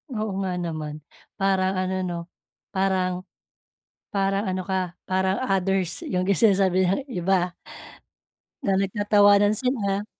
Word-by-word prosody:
Oo 215 -1 -2
nga 185 -2 -2
naman. 155 -4 -5 0.3
Parang 190 -1 +1
ano 185 0 -1
'no, 175 -1 -3 0.5
parang 185 -1 0 0.8
parang 195 +1 0
ano 185 -1 -2
ka, 185 -2 -2
parang 190 0 +1 0.2
others 190 -2 0
'yung 180 0 0
sinasabi 190 -2 +3
ng 195 - +1
iba. 180 -1 +1 1.1
Na 195 - +2
nagtatawanan 205 +1 +4
sila. 210 -5 -1
190 Hz, 110 wpm, -24 LUFS, 180-195 Hz, 1.1 s, nagtatawanan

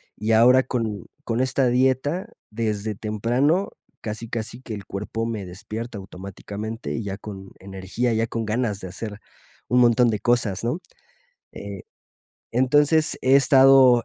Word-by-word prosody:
y 110 +1 -2
ahora 125 +4 +6
con 110 -6 -3 0.2
con 115 +1 0
esta 130 0 +2
dieta, 130 - +1 0.2
desde 105 -1 -2
temprano, 120 - 0 0.3
casi 110 +1 -6
casi 115 +1 -5
que 115 -4 -7
el 100 -1 -7
cuerpo 105 +3 -4
me 110 -4 -4
despierta 110 +5 -7
automáticamente 100 +3 -7
y 115 - -3
ya 100 -1 -4
con 95 -2 -9
energía, 95 +5 -2
ya 110 +1 +1
con 115 -1 -3
ganas 110 -2 -1
de 95 - -7
hacer 105 +3 -7 0.5
un 125 +1 +4
montón 120 0 +5
de 105 - -1
cosas, 115 -5 +1
¿no? 125 +9 -1 0.7
Eh, - - -8 0.7
entonces 145 +5 +3
he 130 +1 +4
estado, 135 -3 +6
115 Hz, 145 wpm, -23 LUFS, 105-125 Hz, 0.7 s, ahora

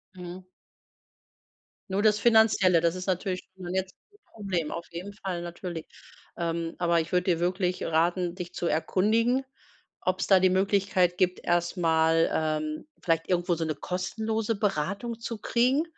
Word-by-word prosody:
Mhm. 180 +1 -8 1.5
Nur 195 +2 0
das 210 -1 +4
Finanzielle, 215 -6 +5
das 170 +1 +1
ist 185 +1 -6
natürlich 185 0 -1
schon 180 -1 -6
jetzt, 190 0 -2 0.2
äh, 410 - -25
'n - - -24
Problem 185 -7 -2
auf 170 0 -6
jeden 180 +4 -7
Fall 190 -4 -4
natürlich. 175 -1 -6 0.5
Ähm. 165 -1 -2
Aber 170 -1 +3
ich 160 - -7
würde 180 -1 +2
dir 165 - 0
wirklich 180 +1 0
raten, 170 +2 +1
dich 180 -1 -7
zu 175 - -2
erkundigen, 220 - +2 0.6
ob's 185 +1 0
da 190 -2 +6
die 185 - +5
Möglichkeit 190 -1 +2
gibt, 185 -1 +1
erst 175 +1 0
mal, 165 -1 +3
ähm, 155 - -2
vielleicht 165 -1 0
irgendwo 175 -1 +1
so 165 - -2
'ne 155 - -2
kostenlose 220 +7 -2
Beratung 200 +4 -2
zu 230 -1 -5
kriegen, 250 +7 +2
180 Hz, 160 wpm, -27 LUFS, 170-200 Hz, 1.5 s, da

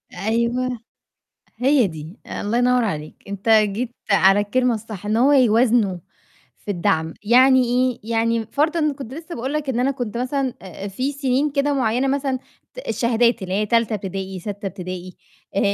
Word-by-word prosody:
أيوه، 235 +5 -1 0.8
هي 260 -2 +3
دي، 160 +3 -9
الله 225 +4 -2
ينوّر 250 -1 +3
عليك، 155 -7 -4
أنت 200 +2 -5
جيت 220 +2 +3 0.2
على 195 +1 +5
الكلمة 245 +4 +1
الصح 215 -2 -7
إن 215 +1 +1
هو 270 +5 +4
يوازنوا 230 -6 +3 0.6
في 205 - -7
الدعم، 160 -3 0
يعني 255 +3 +6
إيه؟ 250 +1 +1
يعني 230 0 +1
م 220 - -7
فرضًا 305 0 +1
كنت 265 -2 -8
لسه 335 +2 -8
باقول 260 +4 -4
لك 300 -2 -2
إن 245 -2 0
أنا 270 +2 +2
كنت 245 -4 -4
مثلًا 260 0 -1
آآ 190 +1 -9
آآ - - -3
في 255 +9 -2
سنين 275 +1 0
كده 285 0 +1
معيّنة 255 +1 +1
مثلًا 270 -1 0 0.4
ت - - -14
الشهادات 235 0 +2
اللي 185 0 -3
هي 210 +1 +1
تالتة 230 -1 +2
ابتدائي، 190 -1 -5
سَتة 205 +1 -6
ابتدائي 185 -1 -6 0.4
آآ - - +3
235 Hz, 170 wpm, -21 LUFS, 200-260 Hz, 0.8 s, يعني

